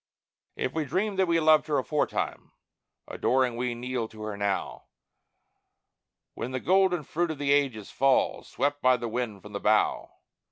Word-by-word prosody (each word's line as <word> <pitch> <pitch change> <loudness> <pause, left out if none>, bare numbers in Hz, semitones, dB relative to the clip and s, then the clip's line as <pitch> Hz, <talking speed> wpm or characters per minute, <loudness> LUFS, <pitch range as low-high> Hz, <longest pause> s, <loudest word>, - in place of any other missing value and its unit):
If 130 - -2
we 160 -1 -1
dreamed 190 +7 -1
that 190 - +3
we 165 -1 +3
loved 155 -1 +4
Her 150 -2 +1
aforetime, 145 +3 -2 0.5
adoring 130 -1 +1
we 120 0 -2
kneel 125 -1 -3
to 110 -1 -11
Her 105 -1 -4
now, 100 -1 -2 1.5
When 120 - -5
the 130 0 -3
golden 185 0 +2
fruit 170 +4 -1
of 155 - -4
the 140 0 0
ages 135 -7 +1
falls, 135 0 +1
swept 145 0 -1
by 130 0 +4
the 120 - -4
wind 115 -4 -4
from 105 - -11
the 100 - -3
bough. 110 +1 +2
130 Hz, 165 wpm, -27 LUFS, 115-155 Hz, 1.5 s, loved